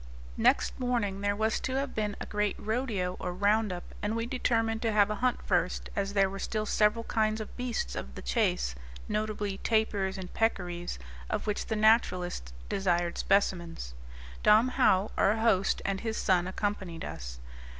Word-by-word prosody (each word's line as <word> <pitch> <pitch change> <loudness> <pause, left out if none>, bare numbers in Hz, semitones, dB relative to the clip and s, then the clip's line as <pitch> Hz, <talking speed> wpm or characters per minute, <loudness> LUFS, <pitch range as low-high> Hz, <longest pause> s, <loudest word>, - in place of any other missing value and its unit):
Next - - +2
morning 235 -6 0
there 205 0 +1
was 220 +1 +1
to 260 - -3
have 275 0 -1
been 210 -2 -1
a - - -4
great 210 -1 -1
rodeo 215 -5 -1
or 180 - -3
round 205 +3 +2
up, 175 -1 -5 0.2
and 210 +2 -1
we 230 0 -1
determined 225 -3 0
to 225 - +1
have 210 0 +4
a - - 0
hunt 250 -1 +1
first, 180 -1 0
as 200 -1 -1
there 195 -1 +4
were 195 +1 -6
still 215 +2 -2
several 215 +2 +2
kinds 215 -1 0
of 215 - -7
beasts 245 - -2
of 65 0 -6
the - - -8
chase, - - +1 0.3
notably 210 -2 -2
tapirs 205 -4 +1
and 185 -1 -7
peccaries, 175 -6 -1 0.3
of - - -2
which 210 -1 -2
the 220 - -1
naturalists 185 - +2 0.2
desired 175 -3 0
specimens. 175 - 0 0.5
Dom 225 +5 +5
Joao, 205 -6 +3
our 200 +2 +4
host, 220 -4 +2
and 195 -1 0
his 225 -1 -2
son 180 -2 +2
accompanied 190 -3 -3
us. - - -7
205 Hz, 170 wpm, -30 LUFS, 185-220 Hz, 0.5 s, Dom